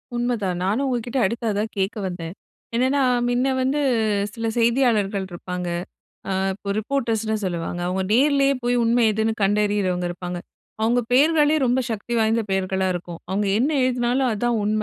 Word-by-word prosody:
உண்மதான் 230 -7 -1
நானும் 220 +9 +1
உங்கக்கிட்ட 245 0 -1
அடுத்து 230 +4 -2
அதான் 210 +2 -2
கேட்க 195 +3 -1
வந்தேன். 175 -2 -6 0.4
என்னென்னா, 260 +4 +2 0.3
மின்னே 245 +2 +1
வந்து 265 +3 +1 0.5
சில 230 -1 -3
செய்தியாளர்கள் 230 -5 +2
இருப்பாங்க. 180 +1 -5 0.6
அ - - 0 0.2
இப்போ 200 +1 -6
ரிப்போர்டர்ஸ்ன்னு 225 -2 -1
சொல்லுவாங்க. 175 -1 -3
அவுங்க 185 +1 -1
நேர்லேயே 275 +1 +4
போய் 245 0 +1
உண்மை 235 +1 +3
எதுன்னு 220 +1 0
கண்டறியிறவங்க 200 -3 +1
இருப்பாங்க. 175 0 -5 0.4
அவுங்க 235 +2 +3
பெயர்களே 300 +3 +4
ரொம்ப 250 +2 +2
சக்தி 225 +2 -4
வாய்ந்த 225 +1 +2
பெயர்களா 190 0 0
இருக்கும். 175 -1 -6
அவுங்க 200 +2 0
என்ன 265 +6 +2
எழுதினாலும், 250 +1 +1
அதான் 240 +3 0
உண்ம. 215 +1 0
225 Hz, 145 wpm, -23 LUFS, 190-245 Hz, 0.6 s, நேர்லேயே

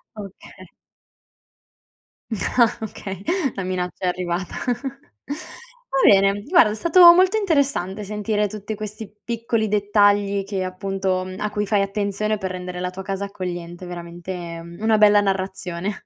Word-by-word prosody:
Oka 200 -2 -11 1.7
No, 220 - -2 0.5
okay, 195 -1 -8 0.3
la 195 - -3
minaccia 180 0 -3
è - - +2
arrivata. 180 0 -2 1.4
Va 270 - +6
bene, 195 +1 +4
guarda, 335 - +6
è - - -3
stato 340 - +8
molto 370 +4 +4
interessante 280 - 0
sentire 210 +1 -1
tutti 210 +1 -6
questi 215 0 -7
piccoli 230 -2 -1
dettagli 205 -1 +2
che 195 -1 -3
appunto 190 0 -2 0.2
a 210 0 -2
cui 210 -1 -2
fai 205 -1 +2
attenzione 205 +1 -1
per 190 -2 -3
rendere 180 0 -6
la 180 0 -2
tua 190 +1 -8
casa 195 +1 -3
accogliente, 175 -2 -6
veramente 175 0 -7 0.2
una 220 0 +3
bella 205 -1 +6
narrazione. 190 -1 -3
200 Hz, 130 wpm, -22 LUFS, 185-210 Hz, 1.7 s, stato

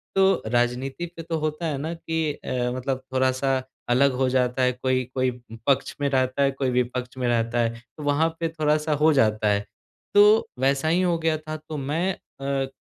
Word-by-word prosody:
तो 195 -1 +4
राजनीति 125 +6 0
पे 165 - -6
तो 165 0 -2
होता 155 +2 -2
है 150 -4 -1
ना 155 +4 -3
कि 160 -2 -2
अ, - - -10 0.3
मतलब 130 +1 -2
थोड़ा-सा 130 0 +1 0.3
अलग 135 +3 +4
हो 130 - +3
जाता 125 0 +1
है। 125 - +4
कोई 130 +1 0
कोई 130 -1 +2 0.4
पक्ष 140 -2 +1
में 140 - +2
रहता 130 0 +1
है 140 - +3
कोई 135 -1 -1
विपक्ष 125 +1 -2
में 125 -1 -1
रहता 115 0 +1
है। 115 -1 +2 0.3
तो 150 - -7
वहाँ 145 +3 +2
पे 165 - 0
थोड़ा-सा 155 -1 +1
हो 160 +1 +6
जाता 110 -5 +2
है। 100 0 +1 0.5
तो 210 +2 +6
वैसा 135 +3 +1
ही 170 +3 +3
हो 175 -2 +2
गया 160 -1 +1
था। 155 0 -6
तो 155 0 -8
मैं 155 +7 -1
अ, 135 -4 -4
135 Hz, 195 wpm, -24 LUFS, 130-155 Hz, 0.5 s, हो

